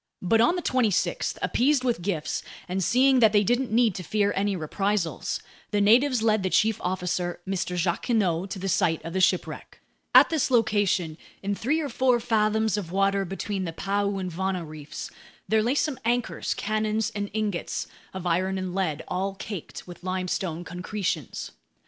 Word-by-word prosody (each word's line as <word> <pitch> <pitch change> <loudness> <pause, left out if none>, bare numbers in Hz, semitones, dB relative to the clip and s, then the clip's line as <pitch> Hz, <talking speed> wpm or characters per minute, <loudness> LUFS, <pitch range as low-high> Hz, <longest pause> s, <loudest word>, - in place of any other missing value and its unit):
But 225 +5 +4
on 240 +10 +4
the 355 - -3
26th, 230 -7 +1
appeased 270 +1 +2
with 240 -7 0
gifts 170 -5 -2 0.3
and 185 +1 -1
seeing 260 +7 +4
that 220 -3 +5
they 205 -1 +5
didn't 245 +4 +1
need 230 -2 +3
to 185 - -5
fear 205 +3 +1
any 200 0 0
reprisals, 185 +2 -1 0.3
the 205 - 0
natives 240 +4 +4
led 215 -2 +3
the 185 - 0
chief 220 +3 +2
officer, 180 -1 -2
Mr. 185 -2 -2
Jacquinot, 180 0 0
to 195 - -5
the 190 +1 -4
site 165 -3 +1
of 165 - -5
the 190 - +1
shipwreck. 185 0 0 0.4
At - - +8
this 315 -5 +1
location, 205 -9 +1 0.2
in 200 +1 0
three 265 +10 0
or 305 - -2
four 255 -3 +2
fathoms 220 -2 +1
of 180 -5 -4
water 195 +1 +2
between 195 +1 -3
the 165 - -4
Paeu 200 +2 -1
and 185 -1 -4
Vana 185 0 -2
reefs, 150 -1 -8 0.4
there 220 0 +3
lay 240 +5 +1
some 295 -2 0
anchors, 240 +1 -1
cannons, 215 +1 -1
and 205 -1 -4
ingots 210 -4 -2 0.3
of 190 -1 -7
iron 185 +3 +1
and 185 -1 -4
lead, 175 -6 -1
all 195 +1 -2
caked 195 -3 -7
with 175 0 -11
limestone 185 -2 -2
concretions. 180 - -4
200 Hz, 175 wpm, -26 LUFS, 180-220 Hz, 0.4 s, At